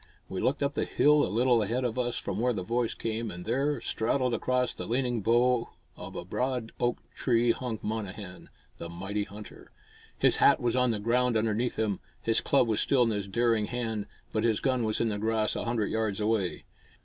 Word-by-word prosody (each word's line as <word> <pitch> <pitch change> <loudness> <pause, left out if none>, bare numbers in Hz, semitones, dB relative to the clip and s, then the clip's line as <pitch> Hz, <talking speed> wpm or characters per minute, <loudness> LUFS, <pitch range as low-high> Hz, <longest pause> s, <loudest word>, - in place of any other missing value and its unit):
We 95 - -4
looked 140 +2 +1
up 140 0 0
the - - 0
hill 150 0 +4
a - - 0
little 120 +1 +3
ahead 115 +5 -1
of 120 0 -2
us 120 -1 -1
from - - -3
where 125 +1 +2
the 95 -4 -3
voice 115 +3 -1
came, 115 0 -3
and 90 -2 -7
there, 135 +6 0
straddled 125 +2 0
across 125 +1 0
the - - -6
leaning 120 -1 0
bough 120 +2 +2 0.3
of - - -9
a - - -5
broad 125 -3 -2
oak 120 0 +1 0.2
tree 120 -2 +2
hung 120 -2 -3
Monnehan, 100 -4 -5 0.3
the 85 - -6
mighty 95 +4 -3
hunter. 105 +1 -12 0.5
His - - +4
hat - - +5
was 120 0 0
on 125 -1 +3
the 110 - 0
ground 120 +2 +2
underneath 110 +2 0
him, 105 -3 0 0.2
his 115 0 +1
club 135 -4 +3
was 110 -2 +1
still 130 -3 +3
in 115 - +1
his 100 -2 -2
daring 115 0 +1
hand, 110 -4 -3 0.3
but 110 - 0
his 115 -3 +2
gun 130 -3 +1
was 110 -1 0
in 115 - +1
the 105 -1 -2
grass 110 0 0
a - - -3
hundred 115 -3 -1
yards 110 -2 -1
away. 105 -4 0
115 Hz, 210 wpm, -29 LUFS, 105-125 Hz, 0.5 s, hat